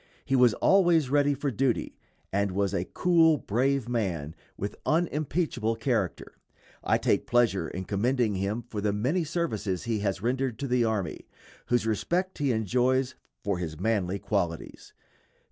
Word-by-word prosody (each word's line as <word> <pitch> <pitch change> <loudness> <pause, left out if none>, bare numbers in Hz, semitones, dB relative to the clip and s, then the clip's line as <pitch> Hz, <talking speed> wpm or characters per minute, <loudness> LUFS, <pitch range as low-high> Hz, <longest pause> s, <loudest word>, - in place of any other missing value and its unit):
He 135 - +1
was 125 -4 +5
always 175 -8 +3
ready 145 0 +3
for 140 0 -2
duty, 125 +1 -1 0.3
and 100 -1 +1
was 100 0 0
a 90 -2 -1
cool, 165 - +3
brave 130 +2 0
man, 90 -11 -2 0.2
with 100 - -4
unimpeachable 155 -7 0
character. 115 - -2 0.4
I - - +3
take - - 0
pleasure 115 -8 +2
in 90 +4 -6
commending 115 +3 +1
him 100 +5 -2
for 105 -1 -5
the 105 0 0
many 130 - 0
services 140 - -2
he 115 -2 -1
has 100 -1 -2
rendered 130 0 -1
to 140 - -3
the 125 -1 +2
army, 110 -5 -2 0.4
whose 120 -2 +1
respect 175 - -1
he 140 -3 +1
enjoys 125 +4 +1 0.3
for 100 -3 -1
his 80 -3 -5
manly 100 -2 0
qualities. 90 -5 -3
115 Hz, 150 wpm, -28 LUFS, 100-140 Hz, 0.4 s, was